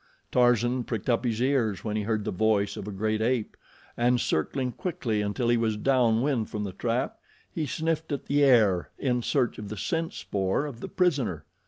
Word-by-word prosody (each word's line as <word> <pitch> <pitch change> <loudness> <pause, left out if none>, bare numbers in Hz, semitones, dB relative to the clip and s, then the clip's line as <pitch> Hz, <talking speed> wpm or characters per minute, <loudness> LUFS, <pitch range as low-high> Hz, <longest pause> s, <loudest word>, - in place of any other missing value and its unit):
Tarzan 120 0 +3
pricked 115 +1 -2
up 120 +2 +1
his 115 -2 0
ears 120 -7 +1
when 105 -1 -2
he 110 - 0
heard 105 0 -1
the - - -1
voice 105 +1 +1
of - - -7
a - - -4
great 110 +2 -1
ape 120 -1 0 0.4
and, 120 +1 +2
circling 125 - -1
quickly 120 - -2
until 105 +4 -1
he 120 - +4
was 110 -2 0
down 120 -2 +3
wind 135 -6 0
from 105 -1 -3
the 100 - -4
trap, 120 +6 -2 0.3
he 155 -3 -2
sniffed 160 +1 -2
at 140 - -3
the 145 +1 +2
air 110 -10 +4
in 125 -3 0
search 125 0 0
of 105 -1 -7
the 110 - -6
scent 165 +6 -2
spoor 95 +7 -1
of 135 -6 -7
the - - -6
prisoner. 135 - 0
120 Hz, 200 wpm, -27 LUFS, 105-130 Hz, 0.4 s, he